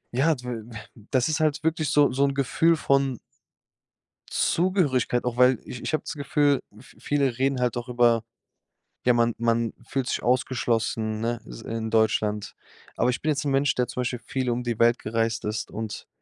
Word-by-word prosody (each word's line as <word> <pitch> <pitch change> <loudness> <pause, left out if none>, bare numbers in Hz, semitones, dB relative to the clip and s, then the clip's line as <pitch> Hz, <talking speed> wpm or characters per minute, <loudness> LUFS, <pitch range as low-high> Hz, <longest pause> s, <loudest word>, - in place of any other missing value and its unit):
ja, 150 +6 +3
dw 125 - -12
we 115 -3 -5
äh, 115 - -8 0.3
das 130 -2 +2
ist 155 -1 0
halt 155 -1 +1
wirklich 160 -2 0
so 145 -2 +4
so 135 +2 +1
'n 140 -1 +1
Gefühl 160 +5 +3
von 135 -4 +1 1.1
Zugehörigkeit, 145 -10 +1
auch 125 0 -2
weil 125 -2 +5
ich 125 - -8
ich - - -3
habe 155 - 0
das - - -5
Gefühl, 145 -1 +1 0.2
v 125 - -17
viele 140 -4 0
reden 135 0 +1
halt 125 -1 0
auch 120 +1 -5
über, 120 -2 +3 0.8
ja, 125 - +5
man 115 -1 +2
man 115 -1 +1
fühlt 135 0 -2
sich - - -2
ausgeschlossen, 115 -3 0
ne? 115 +1 -2
S - - -9
in 110 0 -4
Deutschland. 105 -2 +1 0.4
Aber 125 - +2
ich 125 - -2
bin 155 - -1
jetzt 150 0 0
'n 140 - 0
Mensch, 135 +1 +2
der 125 -1 +1
zum 125 - -4
Beispiel 125 0 -2
viel 125 +2 -3
um 120 +1 -1
die 120 -2 -3
Welt 120 +1 +4
gereist 115 +1 -1
ist 105 0 -3
und 110 -1 -6
125 Hz, 195 wpm, -25 LUFS, 115-140 Hz, 1.1 s, weil